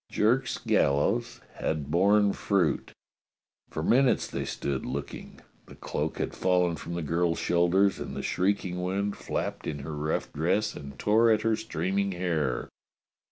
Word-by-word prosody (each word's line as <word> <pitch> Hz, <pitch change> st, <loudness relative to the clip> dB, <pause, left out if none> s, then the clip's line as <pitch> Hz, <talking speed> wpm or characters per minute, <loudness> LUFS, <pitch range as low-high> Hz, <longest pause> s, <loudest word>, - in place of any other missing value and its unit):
Jerk's 120 Hz, +5 st, +1 dB
gallows 100 Hz, +13 st, +1 dB, 0.2 s
had 75 Hz, -2 st, -2 dB
borne 100 Hz, +4 st, +4 dB
fruit. 90 Hz, -8 st, 0 dB, 0.8 s
For 80 Hz, -, -4 dB
minutes 130 Hz, +7 st, +3 dB
they -, -, -4 dB
stood 70 Hz, -2 st, -3 dB
looking. -, -, -6 dB, 0.3 s
The -, -, -12 dB
cloak -, -, -3 dB
had -, -, -2 dB
fallen 90 Hz, -2 st, +2 dB
from 85 Hz, +1 st, -6 dB
the 85 Hz, -, -3 dB
girl's 85 Hz, +2 st, +1 dB
shoulders, 90 Hz, +3 st, +2 dB
and -, -, -6 dB
the -, -, -4 dB
shrieking 90 Hz, -1 st, 0 dB
wind 100 Hz, +3 st, -1 dB
flapped -, -, -4 dB
in 75 Hz, -, -2 dB
her 80 Hz, -, -5 dB
rough 75 Hz, +2 st, -2 dB
dress 100 Hz, +8 st, +1 dB
and 70 Hz, -1 st, -9 dB
tore 110 Hz, +2 st, +4 dB
at 110 Hz, -1 st, +3 dB
her 115 Hz, -1 st, +2 dB
streaming 100 Hz, -2 st, -1 dB
hair. 80 Hz, -8 st, -1 dB
90 Hz, 150 wpm, -28 LUFS, 80-105 Hz, 0.8 s, borne